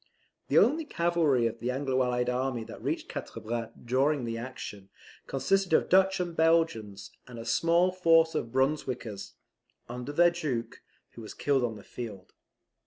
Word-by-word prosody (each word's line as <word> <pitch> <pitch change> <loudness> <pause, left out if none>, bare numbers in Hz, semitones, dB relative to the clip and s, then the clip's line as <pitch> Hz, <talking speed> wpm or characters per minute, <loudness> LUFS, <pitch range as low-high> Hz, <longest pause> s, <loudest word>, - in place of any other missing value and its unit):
The - - +2
only 310 +6 +4
cavalry 170 - +1
of 115 0 -2
the 120 - -3
anglo 130 0 0
allied 125 -1 0
army 125 -1 -1
that 110 - -11
reached - - -2
Quatre - - -7
Bras 115 0 -4 0.2
during 135 +2 +1
the 115 0 -3
action, 115 -5 -7 0.4
consisted 190 +7 0
of - - +3
Dutch 190 +1 +4
and 175 -2 -3
Belgians, 160 -12 +1 0.2
and 125 -2 -10
a 115 - -7
small 170 +9 +3
force 165 -3 +4
of 115 - -3
Brunswickers, 130 -6 -2 0.5
under 125 +3 -6
their 175 +3 +5
Duke, 135 -10 -4 0.3
who 115 - -11
was 110 - -9
killed 140 -3 +1
on 115 -2 -1
the 105 - -12
field. 105 -6 -8
130 Hz, 165 wpm, -29 LUFS, 115-165 Hz, 0.5 s, their